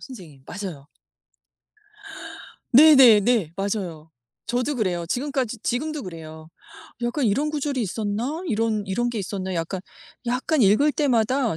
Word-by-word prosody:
선생님. 175 - -12
맞아요. 175 -8 -7 1.9
네네네. 240 - +6
맞아요. 185 -6 -4 0.4
저도 250 +4 -1
그래요. 180 -7 -1
지금까지 255 - -2
지금도 300 +3 -2
그래요. 160 -2 -10 0.5
약간 240 +3 -1
'이런 275 +9 +1
구절이 290 -3 -2
있었나? 220 - -3
이런 220 -3 0
이런 240 +6 -1
게 230 - -4
있었나?' 190 -1 -4
약간 170 +2 -3 0.5
약간 255 +3 +1
읽을 240 +10 +4
때마다 255 - +1
225 Hz, 280 characters per minute, -23 LUFS, 190-265 Hz, 1.9 s, 네네네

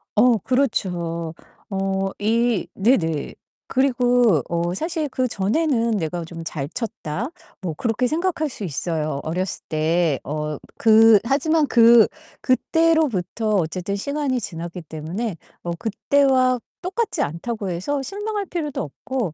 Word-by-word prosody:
어 235 +1 +5
그렇죠. 175 -10 -1 0.4
어 195 0 -1
이 230 -1 +1
네네. 185 - +1 0.3
그리고 245 - +3
어 170 +1 -1
사실 320 - -2
그전에는 235 0 +1
´내가 165 0 -3
좀 165 -1 -8
잘 145 -3 -4
쳤다.´ 225 - -4 0.3
뭐 170 -4 -3
그렇게 235 +4 0
생각할 315 +1 0
수 215 - -7
있어요 155 -3 -2
어렸을 180 +4 -3
때. 160 -2 +1
어 150 0 -3 0.2
그 220 -1 +7
하지만 300 +4 +2
그 235 -2 +7 0.3
그때로부터 255 - +1
어쨌든 185 +3 -1
시간이 280 +3 -1
지났기 170 -4 -6
때문에 165 +7 -4 0.3
어 170 - -3
그때와 255 +3 +2 0.2
똑같지 410 +5 -1
않다고 195 +6 -4
해서 270 +12 -2
실망할 410 +4 -3
필요도 315 -6 -3
없고 205 - -4
220 Hz, 255 characters per minute, -22 LUFS, 170-260 Hz, 0.4 s, 그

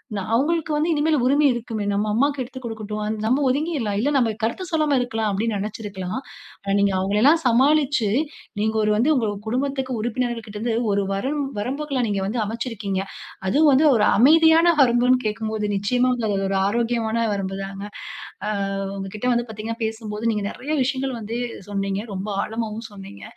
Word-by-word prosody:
ந - - -1
அவுங்களுக்கு 315 +6 +1
வந்து 310 +3 +1
இனிமேல் 310 0 +2
உரிமை 285 +3 +4
இருக்குமே! 230 -3 -4
நம்ம 200 +1 0
அம்மாக்கு 280 +5 +1
எடுத்து 260 +1 -9
கொடுக்கட்டும். 215 -2 -4 0.2
நம்ம 255 +6 +2
ஒதுங்கிர்லாம். 270 -7 -1
இல்ல 260 +7 +1
நம்ம 245 -4 +3
கருத்து 235 +12 -1
சொல்லாம 305 -4 +2
இருக்கலாம், 225 -3 -1
அப்பிடீன்னு 210 +2 -1
நினச்சிருக்கலாம். 200 -1 -4 0.4
ஆனா 195 - -1
நீங்க 200 -1 +3
அவுங்களையெல்லாம் 210 - +4
சமாளிச்சு, 265 -1 +3 0.5
நீங்க 220 +1 0
ஒரு 210 - +2
வந்து 235 +8 +2
உங்க 235 -5 +1 0.2
குடும்பத்திக்கு 265 +2 -1
உறுப்பினர்கள்கிட்ட 235 -2 -3
இருந்து 230 +1 -1 0.2
ஒரு 200 - +2
வரம் 275 +9 -1 0.2
வரம்புகள 270 +4 -2
நீங்க 200 -2 -1
வந்து 220 +4 -1
அமச்சிருக்கீங்க. 215 -3 -3 0.5
அதுவும் 300 +9 +5
வந்து 280 +4 +4
ஒரு 210 -2 +3
அமைதியான 320 +6 +6
வரம்புன்னு 250 0 +4
கேட்கும்போது, 215 0 -2
நிச்சயமா 245 +6 +1 0.2
அது 205 - 0
ஒரு 195 - +1
ஆரோக்கியமான 230 +1 0
வரம்புதாங்க. 195 0 -4 0.6
ஆ - - 0 0.5
உங்கக்கிட்ட 195 +4 -4
வந்து 240 0 -1
பார்த்தீங்கனா, 220 +2 -5
பேசும்போது 220 0 -2
நீங்க 210 -1 -2
நிறைய 285 +4 -7
விஷயங்கள் 265 -1 -2
வந்து 225 +2 -4 0.3
சொன்னீங்க, 195 0 -2
ரொம்ப 190 +3 -4
ஆழமாவும் 225 0 -4
சொன்னீங்க. 195 - -11
230 Hz, 155 wpm, -23 LUFS, 210-265 Hz, 0.6 s, அமைதியான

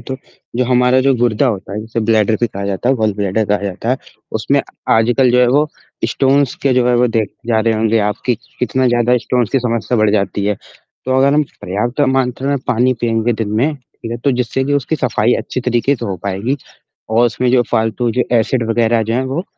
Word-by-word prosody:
तो 130 - -6 0.4
जो 125 - +2
हमारा 125 +1 +3
जो 135 0 +3
गुर्दा 120 +2 +2
होता 100 -5 -3
है 105 - -3
जिसे 110 +1 -4
ब्लैडर 110 0 +2
भी 120 - +3
कहा 100 -1 -6
जाता 100 +5 -2
है 135 - +4
गॉल 110 -4 0
ब्लैडर 100 +2 0
कहा 105 0 +1
जाता 100 +3 -4
है, 130 - +2 0.4
उसमें - - +1 0.3
आजकल 120 +3 +3
जो 125 +1 +4
है 125 - +5
वो 145 +4 +2 0.4
स्टोन्स 135 +2 +2
के 135 - +3
जो 125 -1 +2
है 125 - +3
वो 125 +1 +3
देखे 115 +1 -3
जा 110 -1 +3
रहे 115 0 +1
होंगे 110 +1 +1
आप 105 - -2
कि 125 - +3 0.2
कितना 130 +2 0
ज़्यादा 120 +1 +2
स्टोन्स 120 -2 -1
की 135 - +3
समस्या 115 0 -1
बढ़ 110 -1 +3
जाती 100 -1 0
है। 105 -1 0 0.5
तो 130 0 +1
अगर 140 +2 +4
हम 150 - +4 0.2
पर्याप्त 105 +9 -2 0.2
मात्रा 130 +1 -1
में 140 - +1
पानी 125 +1 +2
पिएँगे 115 0 +1
दिन 110 -2 -3
में 145 +6 +1
ठीक 125 -3 -12
है, 120 - -2
तो 140 +4 0
जिससे 125 +1 -1
भी 145 - -1
उसकी 145 +3 -1
सफाई 120 -3 +1
अच्छी 130 - -3
तरीके 125 +3 +1
से 120 - -6
हो 95 -2 -3
पाएगी 100 +8 -1 0.5
और 115 +2 +4
उसमें 125 +2 0
जो 125 - +5
फालतू 115 +2 0
जो 125 - +1
एसिड 120 +2 +1
वगैरह 115 0 +2
जो 115 +1 -2
हैं 130 - +1
वो 135 +7 -3
120 Hz, 225 wpm, -16 LUFS, 110-130 Hz, 0.5 s, है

